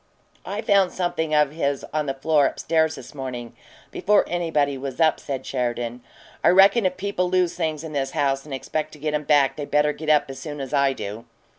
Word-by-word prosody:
"I 210 Hz, +3 st, -4 dB
found 200 Hz, -3 st, +3 dB
something 160 Hz, -4 st, -1 dB
of 150 Hz, -1 st, +3 dB
his 140 Hz, -3 st, -2 dB
on 155 Hz, -1 st, -1 dB
the 135 Hz, -, -2 dB
floor 145 Hz, +1 st, +3 dB
up -, -, -6 dB
stairs 160 Hz, -1 st, +1 dB
this 125 Hz, -, -11 dB
morning, 125 Hz, -4 st, -6 dB, 0.4 s
before 205 Hz, +2 st, +2 dB
anybody 160 Hz, -5 st, 0 dB
was 135 Hz, 0 st, -6 dB
up," 160 Hz, -1 st, +3 dB
said 135 Hz, -2 st, -5 dB
Sheridan. 120 Hz, -1 st, -3 dB, 0.4 s
"I -, -, +6 dB
reckon 195 Hz, +3 st, +6 dB
if 185 Hz, -, -5 dB
people 185 Hz, -2 st, -1 dB
lose 180 Hz, -2 st, +2 dB
things 160 Hz, -3 st, -2 dB
in 160 Hz, -1 st, -7 dB
this 135 Hz, -2 st, -1 dB
house 135 Hz, -1 st, +1 dB
and 150 Hz, -, -13 dB
expect 155 Hz, +3 st, -3 dB
to -, -, -11 dB
get 150 Hz, +1 st, -3 dB
'em 150 Hz, 0 st, -1 dB
back, 140 Hz, -3 st, +3 dB
they 145 Hz, -, -4 dB
better 150 Hz, +1 st, +2 dB
get 155 Hz, +1 st, -6 dB
up 150 Hz, -1 st, +4 dB
as 135 Hz, -, -9 dB
soon 145 Hz, +1 st, -7 dB
as 135 Hz, 0 st, -6 dB
I 140 Hz, -1 st, +3 dB
do." 105 Hz, -1 st, -7 dB
150 Hz, 220 wpm, -23 LUFS, 135-165 Hz, 0.4 s, I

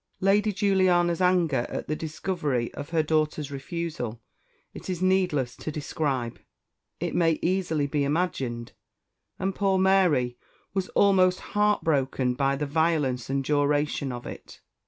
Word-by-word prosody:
Lady 205 Hz, +2 st, +3 dB
Juliana's 185 Hz, -3 st, +2 dB
anger 170 Hz, -9 st, +2 dB
at -, -, -5 dB
the 155 Hz, -, -1 dB
discovery 150 Hz, -6 st, -2 dB
of 145 Hz, 0 st, -7 dB
her 165 Hz, -2 st, +1 dB
daughter's 155 Hz, -1 st, 0 dB
refusal 140 Hz, -5 st, -4 dB, 0.5 s
it -, -, -9 dB
is 180 Hz, -2 st, -2 dB
needless 180 Hz, -9 st, +1 dB
to 155 Hz, -, -5 dB
describe 140 Hz, -5 st, -2 dB, 0.6 s
it -, -, -2 dB
may 165 Hz, -2 st, +2 dB
easily 175 Hz, -5 st, +1 dB
be 145 Hz, 0 st, 0 dB
imagined; 135 Hz, -7 st, -2 dB, 0.7 s
and 190 Hz, +1 st, -1 dB
poor 195 Hz, 0 st, +1 dB
Mary 180 Hz, -11 st, +3 dB, 0.3 s
was 190 Hz, -1 st, -1 dB
almost 185 Hz, -2 st, +4 dB
heartbroken 145 Hz, -11 st, +1 dB
by 135 Hz, +1 st, +1 dB
the 150 Hz, +2 st, -2 dB
violence 145 Hz, -5 st, 0 dB
and 135 Hz, 0 st, 0 dB
duration 145 Hz, -1 st, +1 dB
of 120 Hz, 0 st, -7 dB
it. -, -, -10 dB
155 Hz, 135 wpm, -26 LUFS, 140-185 Hz, 0.7 s, almost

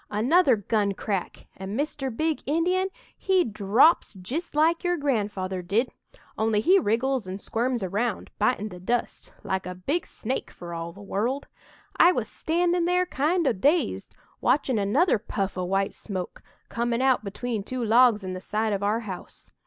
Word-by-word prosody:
another 260 Hz, -, +4 dB
gun 205 Hz, -1 st, 0 dB
crack 195 Hz, -3 st, -4 dB
and 195 Hz, +5 st, -5 dB
Mr. 290 Hz, -2 st, -2 dB
Big 310 Hz, +6 st, -1 dB
Indian 360 Hz, +5 st, +1 dB, 0.3 s
he 380 Hz, -2 st, +2 dB
drops 215 Hz, +6 st, +3 dB
jist 275 Hz, -, -5 dB
like 325 Hz, +3 st, +3 dB
your 355 Hz, 0 st, +1 dB
grandfather 205 Hz, -, -1 dB
did, 210 Hz, +8 st, 0 dB, 0.5 s
only 220 Hz, -1 st, +2 dB
he 370 Hz, -, +5 dB
wriggles 245 Hz, -, 0 dB
and 190 Hz, +1 st, -5 dB
squirms 240 Hz, +1 st, -1 dB
around, 205 Hz, +4 st, -2 dB
bitin' 215 Hz, 0 st, +1 dB
the 180 Hz, -2 st, -10 dB
dust 235 Hz, +7 st, -2 dB
like 190 Hz, -1 st, -2 dB
a 180 Hz, -, -5 dB
big 285 Hz, -, -2 dB
snake 255 Hz, +4 st, -4 dB
for 175 Hz, -1 st, -9 dB
all 165 Hz, 0 st, -5 dB
the 195 Hz, -, -15 dB
world! 235 Hz, +8 st, -2 dB, 0.5 s
"I 355 Hz, +2 st, +7 dB
was -, -, -2 dB
standin' 345 Hz, +1 st, 0 dB
there, 360 Hz, +1 st, +2 dB
kind 335 Hz, +2 st, 0 dB
o' -, -, +3 dB
dazed, 290 Hz, -, 0 dB, 0.3 s
watchin' 260 Hz, -6 st, +2 dB
another 225 Hz, -, +2 dB
puff 195 Hz, -1 st, -3 dB
o' 185 Hz, -, -2 dB
white 195 Hz, +2 st, 0 dB
smoke, 185 Hz, -4 st, -6 dB, 0.3 s
comin' 235 Hz, +1 st, -1 dB
out 260 Hz, -4 st, +3 dB
between 220 Hz, +2 st, -3 dB
two 245 Hz, +3 st, -4 dB
logs 225 Hz, -2 st, +5 dB
in 185 Hz, 0 st, -4 dB
the 185 Hz, -, -6 dB
side 215 Hz, +2 st, -1 dB
of 200 Hz, -, -2 dB
our 210 Hz, +3 st, +1 dB
house. 195 Hz, -5 st, -9 dB
230 Hz, 170 wpm, -26 LUFS, 200-290 Hz, 0.5 s, I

